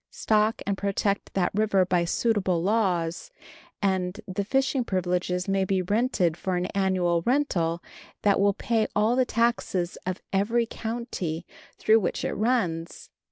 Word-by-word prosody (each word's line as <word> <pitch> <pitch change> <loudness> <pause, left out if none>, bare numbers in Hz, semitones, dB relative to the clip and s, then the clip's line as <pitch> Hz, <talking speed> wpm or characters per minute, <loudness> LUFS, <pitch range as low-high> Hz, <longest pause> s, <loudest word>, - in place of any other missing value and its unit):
Stock 215 0 +1
and 200 -1 -1
protect 200 0 -1
that 180 -2 +1
river 200 -2 +2
by 180 -1 +1
suitable 190 -3 +1
laws, 185 - 0 0.5
and 190 -1 0
the 190 +1 -2
fishing 265 +3 +1
privileges 180 -2 -1
may 195 0 +1
be 190 -1 0
rented 200 -4 +1
for 185 +2 -2
an 180 0 -1
annual 185 -3 +1
rental 175 - 0 0.4
that 200 -1 +3
will 200 0 +3
pay 225 -2 0
all 215 +3 +3
the 255 0 +3
taxes 230 -7 0
of 185 0 -2
every 230 +5 +2
county 220 -9 -4 0.3
through 220 +1 +4
which 180 - -2
it - - -1
runs. 185 -8 -1
195 Hz, 145 wpm, -26 LUFS, 180-220 Hz, 0.5 s, through